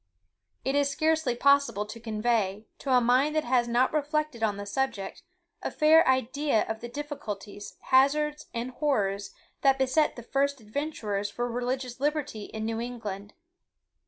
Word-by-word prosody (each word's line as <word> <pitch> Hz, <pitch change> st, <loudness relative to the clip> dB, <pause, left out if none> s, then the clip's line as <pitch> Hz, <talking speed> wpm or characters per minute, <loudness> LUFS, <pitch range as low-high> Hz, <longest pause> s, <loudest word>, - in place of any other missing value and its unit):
It 270 Hz, -, +1 dB
is 285 Hz, 0 st, +2 dB
scarcely 310 Hz, -3 st, +1 dB
possible 280 Hz, -6 st, +3 dB
to 215 Hz, +2 st, -9 dB
convey, 215 Hz, -2 st, -1 dB
to 275 Hz, -, -3 dB
a 250 Hz, -, +6 dB
mind 255 Hz, +5 st, +3 dB
that 310 Hz, -, +2 dB
has 240 Hz, -1 st, +2 dB
not 240 Hz, +4 st, +2 dB
reflected 305 Hz, -4 st, -1 dB
on 210 Hz, -3 st, +1 dB
the 205 Hz, -, -5 dB
subject, 215 Hz, -, -2 dB, 0.4 s
a -, -, -2 dB
fair 315 Hz, +2 st, +5 dB
idea 260 Hz, 0 st, +2 dB
of 220 Hz, 0 st, -3 dB
the 240 Hz, -, -7 dB
difficulties, 215 Hz, -8 st, -7 dB
hazards, 300 Hz, +3 st, +2 dB
and 240 Hz, +2 st, -4 dB
horrors, 205 Hz, -9 st, 0 dB, 0.3 s
that 270 Hz, -1 st, +4 dB
beset 265 Hz, +4 st, +2 dB
the 240 Hz, -, -9 dB
first 275 Hz, +3 st, 0 dB
adventurers 215 Hz, -4 st, -3 dB
for 240 Hz, +4 st, -3 dB
religious 250 Hz, +1 st, -3 dB
liberty 290 Hz, -7 st, -1 dB
in 220 Hz, 0 st, -5 dB
New 225 Hz, 0 st, -2 dB
England. 210 Hz, -4 st, -6 dB
250 Hz, 155 wpm, -28 LUFS, 220-285 Hz, 0.4 s, a